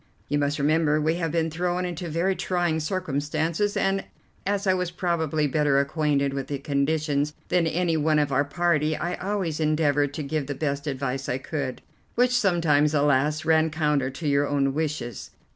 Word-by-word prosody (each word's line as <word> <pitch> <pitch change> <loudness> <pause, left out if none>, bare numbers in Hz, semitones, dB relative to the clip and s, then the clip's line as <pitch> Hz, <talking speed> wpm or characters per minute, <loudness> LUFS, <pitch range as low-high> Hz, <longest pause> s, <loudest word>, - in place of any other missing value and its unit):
You 145 +1 +1
must 145 0 0
remember 155 +1 +2
we 155 +2 +1
have 165 -3 -1
been 165 -1 0
thrown 180 +2 -1
into 175 -1 -4
very 175 +5 0
trying 175 -4 0
circumstances, 160 +3 -1
and 195 0 +1 0.4
as 200 0 0
I 190 - +4
was 180 -1 -1
probably 160 -4 0
better 145 -1 +2
acquainted 140 -1 +1
with 135 -1 -3
the 145 - -3
conditions 145 +1 0
than 175 -2 +2
any 170 0 0
one 155 0 +2
of 145 -2 +1
our 135 +1 +3
party 155 0 +1
I 175 +1 -2
always 185 -5 -2
endeavoured 145 -2 +1
to 155 - -3
give 140 0 -2
the 145 - -3
best 140 0 -2
advice 135 -1 -3
I 125 - 0
could, 135 -2 -4 0.3
which 245 +1 +3
sometimes, 165 -8 +3
alas, 145 +1 +2
ran 160 0 +4
counter 150 -4 0
to 150 +4 -5
your 140 0 +2
own 140 -1 +1
wishes. 150 -5 -3
155 Hz, 175 wpm, -25 LUFS, 145-170 Hz, 0.4 s, I